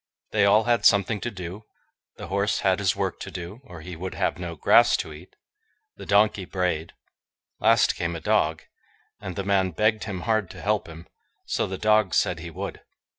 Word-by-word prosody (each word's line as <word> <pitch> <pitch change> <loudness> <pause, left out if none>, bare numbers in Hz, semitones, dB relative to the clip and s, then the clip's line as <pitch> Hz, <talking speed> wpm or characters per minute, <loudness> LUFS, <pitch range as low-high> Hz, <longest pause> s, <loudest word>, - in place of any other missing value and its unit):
They 105 -2 +3
all 105 +2 +5
had 120 0 +1
something 100 +1 +3
to 120 - -2
do. 95 +1 -8 0.5
The - - -7
horse 100 +2 0
had 95 0 +2
his 95 -2 +1
work - - -2
to - - -7
do, 90 +7 -8
or 85 -10 -11
he 90 +2 -8
would 90 +3 -6
have - - -1
no 85 -2 -5
grass - - +5
to 80 - -5
eat. 80 +5 -14 0.6
The - - -11
donkey 105 -1 +3
brayed. 90 -3 -2 0.7
Last 115 +1 +4
came 85 -1 -3
a - - -4
dog, - - +1 0.6
and 95 -3 -7
the 100 - -3
man 95 -2 +2
begged 110 +5 +1
him 95 -4 -5
hard 110 0 0
to 95 -1 -11
help 105 -3 0
him; 80 +1 -11 0.4
so - - -1
the 95 - -5
dog 110 -3 +2
said - - +1
he 85 +1 -7
would. 95 +4 -6
95 Hz, 195 wpm, -25 LUFS, 90-105 Hz, 0.7 s, all